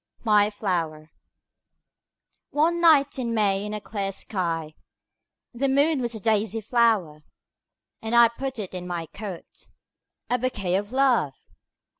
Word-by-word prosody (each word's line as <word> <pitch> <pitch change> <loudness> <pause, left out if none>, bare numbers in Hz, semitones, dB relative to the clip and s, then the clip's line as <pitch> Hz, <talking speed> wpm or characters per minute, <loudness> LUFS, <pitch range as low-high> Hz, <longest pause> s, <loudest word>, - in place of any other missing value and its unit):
My 210 -2 +4
Flower 165 -7 -3 1.4
ONE 335 +3 +1
night 290 -5 +4
in 235 -2 -2
May 200 -2 +1
in 210 - -5
a - - -4
clear 200 -2 -4
skyThe 170 -5 -3 1.0
moon 285 +1 +2
was 235 -1 -2
a - - -5
daisy 220 +1 +1
flower:And! 225 - 0
put 265 0 -4
it 200 -4 -6
in 180 -1 -6
my 175 -2 -3
coat,A 205 +6 -8
bouquet 210 -8 -2
of 205 +2 -2
Love! 250 - +2
215 Hz, 115 wpm, -25 LUFS, 185-245 Hz, 1.4 s, My